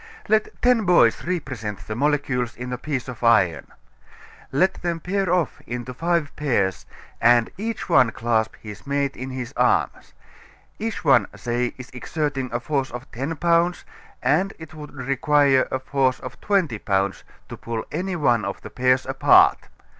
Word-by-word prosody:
Let 215 0 +1
ten 245 -3 +4
boys 170 -11 +4
represent 115 - -4
the 110 - -4
molecules 135 -3 0
in 125 +1 -6
a - - -2
piece 135 -5 -3
of 125 -2 -8
iron. 90 - +3 0.8
Let 185 +8 +1
them 170 -1 -2
pair 190 +1 -1
off 180 -5 0
into 125 +1 -5
five 165 +1 -1
pairs 115 -10 -1 0.3
and 120 0 +4
each 225 +2 -4
one 125 - +5
clasp 115 -1 -1
his 105 +3 -10
mate 140 -1 -1
in 130 +1 -6
his 130 -2 -6
arms; - - +1 0.7
each 220 -5 -4
one, 120 -8 +5
say, 120 +3 -2
is 125 -1 -10
exerting 135 0 -3
a 120 - -1
force 135 +1 -1
of 125 +2 -9
ten 140 +7 -3
pounds, 170 +2 +1 0.4
and 185 +7 +2
it 160 -1 -11
would 150 -1 -9
require 140 0 +2
a - - -1
force 130 -1 0
of 130 - -9
twenty 180 - +1
pounds 95 -1 -1 0.3
to - - -6
pull 115 -1 -5
any 185 +1 -2
one 120 -8 +2
of 100 0 -4
the - - -10
pairs 130 +1 +2
apart. - - +4
130 Hz, 160 wpm, -23 LUFS, 120-160 Hz, 0.8 s, one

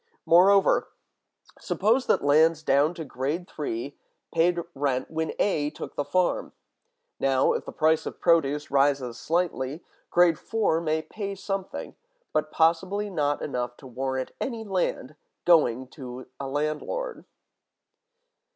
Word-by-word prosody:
Moreover, 195 +4 +5 0.7
suppose 230 +6 +1
that - - +2
lands 155 +2 +4
down 150 +3 +3
to 165 -2 -6
grade 145 +7 -3
three 140 -3 -5 0.3
paid 175 +2 +3 0.2
rent 135 -2 -1
when 160 0 -2
A 150 -7 +1
took 150 - -8
the 145 - -1
farm; 175 +5 0 0.7
now, 135 -1 +3
if - - -3
the - - -6
price 160 0 +2
of - - -7
produce 150 -4 +2
rises 135 -3 +2
slightly, 160 -3 -1 0.3
grade 175 -2 +4
four 210 -8 0
may 155 -1 0
pay 200 0 -5
something, 195 0 -5 0.4
but - - 0
possibly 190 +6 +1
not 145 -4 0
enough 125 -3 -3
to - - -15
warrant 130 +1 -3
any 230 -4 -3
rent 180 -8 -1 0.3
going 130 -7 +4
to 130 -2 -9
a 140 - -4
landlord. 155 - -3
155 Hz, 130 wpm, -26 LUFS, 135-180 Hz, 0.7 s, Moreover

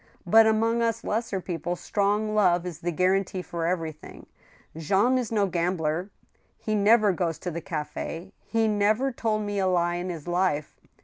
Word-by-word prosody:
But 220 +5 +6
among 225 +2 +2
us 230 0 0
lesser 220 -2 -2
people 175 -1 -3
strong 205 +4 0
love 180 -4 +3
is 175 -4 -6
the 175 - -2
guarantee 185 +2 0
for 170 -2 -3
everything. 165 -4 -5 0.5
Jean 200 - +2
is 240 -3 -4
no 210 -3 +2
gambler; 175 -1 -1 0.5
he 215 - -3
never 210 0 +4
goes 170 -3 -2
to 180 - -5
the 170 +1 -5
za/S, 165 +3 -5 0.2
he 225 -1 +1
never 215 +5 +2
told 220 -3 -1
me 205 -1 -2
a 190 - +1
lie 175 -1 +1
in 180 +1 -4
his 165 -2 -7
life. 175 -4 -1
190 Hz, 170 wpm, -26 LUFS, 175-215 Hz, 0.5 s, But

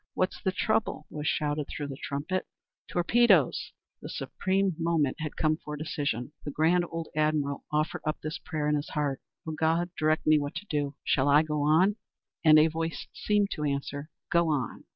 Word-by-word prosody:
"What's 185 - -1
the 190 - +1
trouble?" 215 -4 0
was 150 -1 -4
shouted 150 -1 0
through 145 -1 -5
the 135 - -5
trumpet. 150 +8 -3 0.4
"Torpedoes." 185 - +3 0.3
The - - -7
supreme 190 0 0
moment 165 -5 +1
had 155 -1 -4
come 155 0 +1
for 150 -2 -7
decision. 145 -4 -2
The - - -4
grand 165 +5 +2
old 165 -1 -5
admiral 150 -2 0
offered 155 +2 0
up 155 0 -2
this 155 +3 -4
prayer 155 -3 -3
in 150 - +2
his 145 0 -1
heart, 145 -4 -1 0.3
"O - - -2
God, 160 +3 +1
direct 155 0 +1
me 155 0 +5
what 145 0 -4
to 205 - -5
do. 145 -5 -2
Shall 140 +1 +2
I 145 +2 +6
go 150 -1 -2
on?" 170 +8 +4 0.5
And 155 -2 +8
a 155 - +7
voice 165 0 -2
seemed 205 -1 +1
to 150 - -3
answer, 140 +1 -2 0.2
"Go 170 -1 +3
on!" 140 -7 -2
155 Hz, 185 wpm, -28 LUFS, 145-170 Hz, 0.5 s, And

